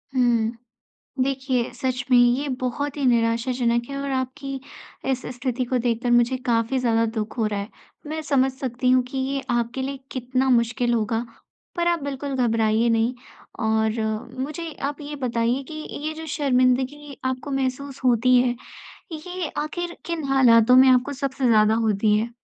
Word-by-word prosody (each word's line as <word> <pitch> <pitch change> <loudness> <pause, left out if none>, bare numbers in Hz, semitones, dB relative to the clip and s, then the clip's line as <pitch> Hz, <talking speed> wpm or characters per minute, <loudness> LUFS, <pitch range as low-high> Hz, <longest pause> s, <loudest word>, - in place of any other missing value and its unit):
हुँ। 235 -3 +2 0.7
देखिए 260 -2 -1
सच 255 +1 -2
में 250 - +6
ये 245 +4 +3
बहुत 275 +3 -2
ही 280 - -2
निराशाजनक 235 0 +1
है 275 - -4
और 280 0 -3
आपकी 265 +1 -3 0.5
ऐसी 255 -1 -2
स्थिति 255 0 -2
को 250 +1 0
देखकर 240 0 0
मुझे 240 +2 +4
काफ़ी 235 +2 +1
ज़्यादा 230 -2 +2
दुःख 215 0 -4
हो 220 - +2
रहा 205 -1 -2
है। 200 - -6 0.4
मैं 315 +1 -3
समझ 275 -3 +2
सकती 255 -2 -1
हूँ 255 0 +5
कि 270 - -3
ये 270 +1 -1
आपके 240 +2 -1
लिए 275 0 -4
कितना 255 +1 -1
मुश्किल 240 0 +2
होगा 225 +1 0 0.5
पर 345 - 0
आप 340 -4 +1
बिल्कुल 280 0 -4
घबराइए 230 -2 +2
नहीं। 230 +2 +1 0.5
और 220 +1 +1 0.4
मुझे 305 +4 -4 0.2
आप 290 +1 -6
ये 295 0 -6
बताइए 240 0 0
कि - - -6 0.3
ये 310 - -1
जो 320 0 -8
शर्मिंदगी 270 0 +1
आपको 260 +2 -3
महसूस 270 0 -3
होती 250 +1 +4
है 245 -1 +1 0.6
ये 355 +1 -5
आखिर 345 +3 -3
किन 335 -3 -3
हालातों 250 -3 +6
में 260 +1 +8
आपको 255 +3 +3
सबसे 270 -1 -1
ज़्यादा 215 -1 +5
होती 215 -1 +2
है? 225 +2 -1
255 Hz, 165 wpm, -23 LUFS, 235-275 Hz, 0.7 s, में